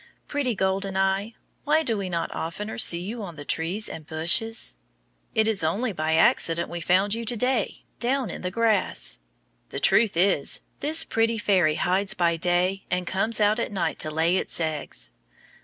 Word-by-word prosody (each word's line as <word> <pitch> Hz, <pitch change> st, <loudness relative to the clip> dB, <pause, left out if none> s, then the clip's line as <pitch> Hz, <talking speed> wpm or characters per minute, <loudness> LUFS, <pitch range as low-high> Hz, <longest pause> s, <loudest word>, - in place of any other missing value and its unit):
Pretty 275 Hz, -5 st, -1 dB
golden 190 Hz, 0 st, -1 dB
eye, 195 Hz, +3 st, 0 dB, 0.3 s
why 310 Hz, +2 st, +2 dB
do 230 Hz, -6 st, 0 dB
we 195 Hz, -3 st, -3 dB
not 170 Hz, -1 st, -3 dB
oftener 205 Hz, +8 st, -5 dB
see 170 Hz, -5 st, +4 dB
you 220 Hz, +6 st, -5 dB
on 175 Hz, -5 st, -7 dB
the 145 Hz, -1 st, -9 dB
trees 175 Hz, +9 st, -1 dB
and 155 Hz, -2 st, -8 dB
bushes? 170 Hz, -, +2 dB, 0.6 s
It 220 Hz, 0 st, +3 dB
is 215 Hz, -6 st, +1 dB
only 210 Hz, +10 st, 0 dB
by 155 Hz, -1 st, 0 dB
accident 165 Hz, +1 st, +2 dB
we 175 Hz, 0 st, -5 dB
found 190 Hz, +5 st, +2 dB
you 230 Hz, +1 st, -2 dB
to 240 Hz, +2 st, 0 dB
day, 250 Hz, -2 st, -1 dB, 0.2 s
down 255 Hz, 0 st, 0 dB
in -, -, -7 dB
the 180 Hz, -, -2 dB
grass. 225 Hz, +2 st, 0 dB, 0.5 s
The -, -, -5 dB
truth 215 Hz, -7 st, +3 dB
is, 180 Hz, -6 st, +2 dB, 0.2 s
this 315 Hz, +2 st, +2 dB
pretty 225 Hz, -4 st, 0 dB
fairy 185 Hz, -7 st, +2 dB
hides 190 Hz, +5 st, 0 dB
by 170 Hz, -3 st, +2 dB
day 180 Hz, +3 st, +1 dB
and 180 Hz, 0 st, -1 dB
comes 205 Hz, +6 st, 0 dB
out 210 Hz, +2 st, +3 dB
at 235 Hz, -, -2 dB
night 195 Hz, -, -2 dB
to 155 Hz, -, 0 dB
lay 165 Hz, +4 st, +1 dB
its -, -, -1 dB
eggs. 150 Hz, -, -3 dB
195 Hz, 180 wpm, -25 LUFS, 170-225 Hz, 0.6 s, see